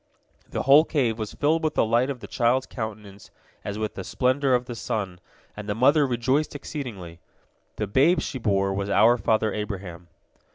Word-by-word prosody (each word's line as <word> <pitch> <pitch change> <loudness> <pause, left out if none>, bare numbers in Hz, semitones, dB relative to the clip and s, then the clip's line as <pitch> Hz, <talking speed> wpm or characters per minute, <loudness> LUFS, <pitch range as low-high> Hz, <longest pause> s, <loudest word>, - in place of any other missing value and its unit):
The - - -3
whole 140 +3 +7
cave 125 -9 -1
was 110 -1 -5
filled 160 +3 +1
with 155 - -1
the - - +3
light 120 +4 +2
of 130 -4 -5
the - - -8
child's 125 +2 +1
countenance 105 -3 -8 0.3
as 105 0 -5
with 110 0 -3
the 95 - -6
splendor 130 +4 +1
of 125 0 -1
the 120 - -6
sun, 100 -5 -4 0.4
and 105 0 -8
the 105 - -1
mother 140 +5 +4
rejoiced 130 +5 0
exceedingly. 105 - -7 0.6
The 105 - -2
babe 140 - +3
she 130 - -4
bore 100 -3 +1
was 100 +1 -3
our 110 +4 +4
father 110 -1 +1
Abraham. 95 -5 -6
115 Hz, 180 wpm, -25 LUFS, 100-130 Hz, 0.6 s, whole